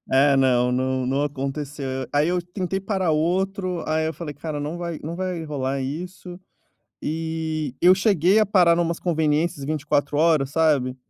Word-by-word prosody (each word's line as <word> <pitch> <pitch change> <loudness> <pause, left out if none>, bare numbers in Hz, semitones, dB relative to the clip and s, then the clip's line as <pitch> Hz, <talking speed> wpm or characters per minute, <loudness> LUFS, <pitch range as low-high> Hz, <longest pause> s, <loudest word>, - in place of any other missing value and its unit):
É, 140 +1 +5
não 125 -2 +3
não 130 0 0
não 135 +2 0
aconteceu. 140 0 -4 0.3
Aí 145 +2 +3
eu 180 0 0
tentei 185 +2 -3
parar 190 -4 0
outro, 185 +2 -1
aí 155 0 0
eu 160 - -2
falei: 150 -4 -7
"Cara, 150 0 -5
não 150 +4 -4
vai 170 -2 -4
não 165 +2 -4
vai 180 -2 -3
rolar 135 -3 -2
isso." 175 +6 -6 0.6
E 160 -3 -3
eu 180 +1 +7
cheguei 195 -1 +3
a 215 - +4
parar 180 -4 +4
numas 170 -1 0
conveniências 160 -2 0
24 145 -1 -1
horas, 155 -4 +3
sabe? 145 -6 +2
160 Hz, 160 wpm, -23 LUFS, 145-175 Hz, 0.6 s, eu